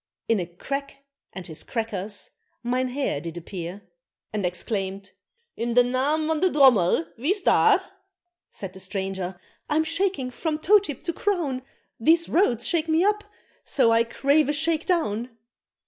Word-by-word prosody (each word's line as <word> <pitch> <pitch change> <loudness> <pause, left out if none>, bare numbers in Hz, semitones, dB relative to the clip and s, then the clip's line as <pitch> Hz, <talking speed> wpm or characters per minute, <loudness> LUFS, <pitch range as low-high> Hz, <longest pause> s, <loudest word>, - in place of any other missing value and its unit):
In 225 -3 +2
a 175 - -3
crack 275 +10 -6 0.3
and 190 -2 -8
his 160 -2 -8
crackers, 210 -3 -4 0.3
mynheer 255 - -1
did 165 +1 -7
appear, 175 +2 -7 0.5
And 205 -4 0
exclaimed, 195 +1 -3 0.4
"In 235 0 -2
de 245 - +7
naam 270 +6 +1
van 320 -1 +1
de 370 +3 +3
drommel, 240 - +5
wie's 365 - +1
daar?" - - +5 0.7
Said 190 -2 -8
the 190 - -11
stranger, 190 -1 -4 0.3
"I'm 310 +1 +3
shaking 330 -5 -1
from 310 +4 -2
toe 410 +7 +5
tip 300 - -7
to 340 - -2
crown, 325 -10 -1 0.4
These 330 +7 +4
roads 245 - +2
shake 330 -2 +1
me 320 +2 +3
up, 420 +1 +2 0.4
so 245 -5 +2
I 230 0 +5
crave 280 +5 +2
a - - +2
shake 315 +1 0
down! 240 - -1
255 Hz, 150 wpm, -25 LUFS, 195-315 Hz, 0.7 s, de